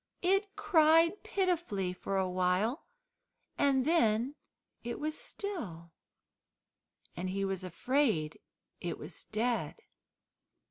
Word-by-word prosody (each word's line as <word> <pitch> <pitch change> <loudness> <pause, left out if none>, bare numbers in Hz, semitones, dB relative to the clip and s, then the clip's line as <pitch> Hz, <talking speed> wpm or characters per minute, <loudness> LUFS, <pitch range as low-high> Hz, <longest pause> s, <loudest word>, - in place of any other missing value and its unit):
It 390 +2 +2
cried 335 -3 +4
pitifully 340 - 0
for 195 +2 -3
a 190 -1 +1
while, 185 - 0 0.7
and 270 -2 +3
then 250 -5 +3 0.5
it 235 0 -4
was 310 +1 -2
still, 190 - -5 1.2
and 185 +2 -3
he 195 +1 -1
was 195 -1 -2
afraid 185 - 0 0.4
it - - -4
was - - -8
dead. 235 +2 -1
240 Hz, 100 wpm, -32 LUFS, -, 1.2 s, cried